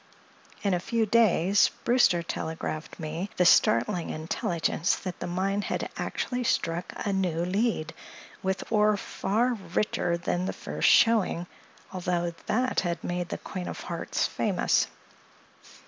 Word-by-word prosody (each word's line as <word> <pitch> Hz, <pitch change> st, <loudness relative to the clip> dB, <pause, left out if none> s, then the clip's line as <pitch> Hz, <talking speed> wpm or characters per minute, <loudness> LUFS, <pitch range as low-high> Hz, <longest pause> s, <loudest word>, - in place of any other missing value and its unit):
In 200 Hz, -2 st, +2 dB
a 180 Hz, -, +1 dB
few 225 Hz, +5 st, 0 dB
days 205 Hz, -3 st, +4 dB
Brewster 235 Hz, -8 st, +4 dB
telegraphed 160 Hz, -1 st, -5 dB
me 165 Hz, +5 st, -4 dB
the 180 Hz, -, +4 dB
startling 160 Hz, +2 st, +4 dB
intelligence 160 Hz, +2 st, -1 dB
that 185 Hz, -3 st, -6 dB
the -, -, -4 dB
mine 195 Hz, +3 st, 0 dB
had -, -, -3 dB
actually 250 Hz, -1 st, -2 dB
struck 170 Hz, -6 st, -1 dB
a 200 Hz, -, 0 dB
new 175 Hz, -3 st, 0 dB
lead, 190 Hz, -4 st, 0 dB, 0.5 s
with 190 Hz, 0 st, -1 dB
ore 210 Hz, -1 st, +4 dB
far 230 Hz, +6 st, 0 dB, 0.2 s
richer 175 Hz, -4 st, +1 dB
than 175 Hz, +1 st, -1 dB
the -, -, -2 dB
first -, -, 0 dB
showing, 215 Hz, -7 st, +4 dB, 0.5 s
although 175 Hz, -2 st, -1 dB
that 255 Hz, +3 st, +1 dB
had 175 Hz, -2 st, -2 dB
made 175 Hz, 0 st, -3 dB
the -, -, -3 dB
Queen 180 Hz, -2 st, -6 dB
of -, -, -6 dB
Hearts -, -, -2 dB
famous. -, -, +1 dB
180 Hz, 135 wpm, -27 LUFS, 170-210 Hz, 0.5 s, days